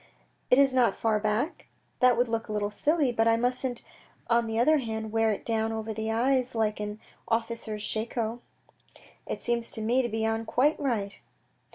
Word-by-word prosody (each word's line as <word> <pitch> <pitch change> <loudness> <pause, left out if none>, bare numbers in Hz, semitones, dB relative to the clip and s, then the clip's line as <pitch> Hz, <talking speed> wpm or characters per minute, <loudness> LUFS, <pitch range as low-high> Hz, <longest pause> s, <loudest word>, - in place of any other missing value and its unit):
" - - -42
It 250 - +6
is 275 -1 +5
not 245 -6 +3
too - - -20
far 220 -2 +2
back? 215 - -1 0.3
That 250 -1 +5
would 245 +1 +2
look 225 -1 -2
a - - -6
little 205 -1 -1
silly, 295 +2 +1
but 225 -1 +1
I 230 0 +4
musn't 245 +1 -1 0.5
on 235 0 +3
the 225 0 -2
other 300 +6 +4
hand 220 -3 -4
wear 225 0 +2
it 205 - -4
down 225 -1 0
over 220 0 -4
the 220 +1 -3
eyes 255 +2 +1
like 215 -2 0
an 210 0 -5 0.3
officer's 225 -2 -2
shako." 225 +1 -2 0.4
" - - -24
It - - -4
seems 235 -1 -1
to 220 - -5
me 240 +4 +3
to 240 - -2
be 220 0 -1
on 225 0 0
quite 285 +7 +2
right." 215 -8 -2
225 Hz, 205 wpm, -28 LUFS, 220-245 Hz, 0.5 s, It